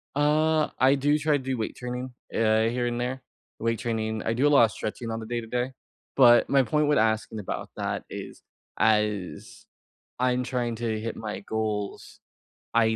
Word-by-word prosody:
Uh, 155 +2 +3
I 135 +2 +5
do 145 +2 +2
try 155 0 +1
to 130 - -8
do 130 -1 -2
weight 110 - -3
training, 125 +1 -5 0.2
eh, 110 0 +3
here 120 +1 -1
and 120 0 -2
there. 130 +2 -3 0.4
Weight 115 -1 0
training 110 -2 -2
I 110 - 0
do 130 +5 +2
a - - +4
lotta 120 -6 +6
stretching 110 +2 -5
on 115 0 -3
the 110 - -7
day-to-day, 120 +2 -2 0.5
but 120 -2 +7
my 135 -1 +4
point 150 +5 +1
with 150 - +3
asking 110 -1 +1
about 105 - -5
that - - -2
is, - - -8 0.4
as 105 -3 0 0.5
I'm 125 0 +2
trying 120 -2 -2
to 110 -1 -2
hit 115 +1 -5
my 110 -1 -5
goals, 105 -2 -4 0.5
I 110 -1 +3
120 Hz, 175 wpm, -26 LUFS, 110-130 Hz, 0.5 s, but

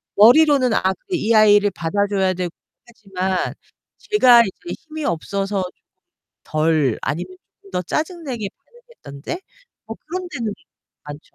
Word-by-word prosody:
머리로는 255 +2 +6
'아, - - +2
그래. 335 - -1
이 230 -3 +1
아이를 205 -1 +5
받아줘야 190 +2 0
되고' 180 -2 -3 0.4
하지만 190 -5 -3 0.5
제가 250 - +6
이제 225 - -4
힘이 315 -1 -7
없어서 195 +3 -2 0.8
덜 155 -5 +1
아니면 180 +4 -4 0.3
좀 195 - -17
더 180 0 -1
짜증 325 - -3
내게 235 -7 -4
반응했던 475 - -15
때? 345 - -4 0.5
뭐 225 0 -7
그런 365 +2 -5
때는 230 -7 -3 0.5
많죠. 145 0 -8
205 Hz, 270 characters per minute, -20 LUFS, 185-285 Hz, 0.8 s, 머리로는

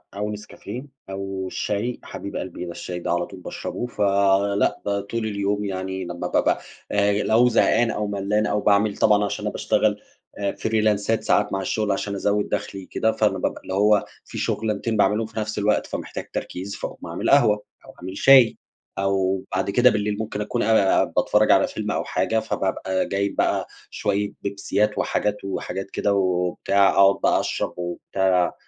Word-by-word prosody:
أو 105 +1 -2
نسكافيه، 105 +5 -8 0.2
أو 95 -1 -4
الشاي 105 +6 -2
حبيب 100 +1 -7
قلبي 90 -1 -5
ده 85 - -6
الشاي 90 +1 -6
ده 85 - -3
على 85 0 +1
طول 95 - -11
باشربه، 120 +6 -5
فلأ 100 -2 +2
ده 100 0 0
طول 110 +3 -4
اليوم 100 -1 -1
يعني 95 -1 -4
لما 85 0 -4
بابقى - - +2 0.3
آآ، 100 0 +2
لو 120 +3 +4
زهقان 115 0 +3
أو 105 0 -2
ملّان 100 +1 0
أو 105 0 0
باعمل 100 0 +2
طبعًا 105 -1 +4
عشان 100 - -4
أنا - - -1
باشتغل - - +1 0.4
آآ 100 -1 0
فريلانسات 110 0 +1
ساعات 105 - +2
مع 95 - -1
الشغل 105 +1 -1
عشان 100 +1 -2
أزوِّد 105 +1 0
دَخلي 95 -1 -4
كده، 110 - 0
فأنا 105 -3 +1
بقى - - -1
اللي - - -6
هو 105 +1 +3 0.2
في - - -9
شغلانتين 110 +1 -1
باعمِلهُم 105 +2 +2
في 110 - -6
نفس 110 0 -3
الوقت، 105 +1 +2
فمحتاج - - -6
تركيز 95 +3 -5
فاقوم - - -7
أعمل - - -2
قهوة 105 0 +4 0.2
أو - - -13
أعمل 95 +2 -6
شاي، 130 -4 +6 0.4
أو 95 -1 +1
بعد 95 +1 0
كده 125 +5 +5
بالليل 105 -2 -1
ممكن 110 -1 -3
أكون 120 +3 -1
آآ، 105 -3 +4
باتفرَّج - - +2
على - - +5
فيلم - - -4
أو - - -1
حاجة، 110 - 0
فبابقى 95 -3 -1
جايب 100 0 -1
بقى - - +1 0.2
شوية 105 0 -1
بيبسيات 100 +1 -1
وحاجات 105 0 0
وحاجات 95 0 -4
كده 100 - 0
وبتاع، 95 +1 +2
أقعد 100 0 +5
بقى - - +4
أشرب - - -2
وبتاع، 90 +1 0
100 Hz, 170 wpm, -23 LUFS, 95-105 Hz, 0.4 s, شاي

